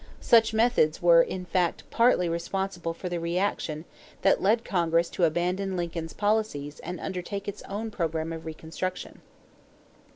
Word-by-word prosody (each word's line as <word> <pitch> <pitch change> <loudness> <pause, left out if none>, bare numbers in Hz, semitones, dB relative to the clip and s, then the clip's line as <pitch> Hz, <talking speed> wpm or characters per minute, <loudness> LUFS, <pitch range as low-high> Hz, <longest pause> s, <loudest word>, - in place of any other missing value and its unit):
Such 225 -2 +5
methods 220 -9 +3
were 170 -1 +7
in 180 +2 -3
fact 175 -1 0
partly 230 -7 +4
responsible 175 +1 -2
for 170 +2 -6
the 175 -1 -2
reaction 170 -2 -1 0.4
that 195 - +4
led 225 +4 +2
Congress 170 -2 +1
to 175 - +2
abandon 180 +4 0
Lincoln's 165 -2 -4
policies 205 -9 -1
and 180 +2 -6
undertake 195 +2 -5
its 205 0 -5
own 215 +3 -4
program 165 -3 -2
of 160 0 -7
reconstruction. 160 +3 -5
180 Hz, 140 wpm, -27 LUFS, 165-200 Hz, 0.4 s, were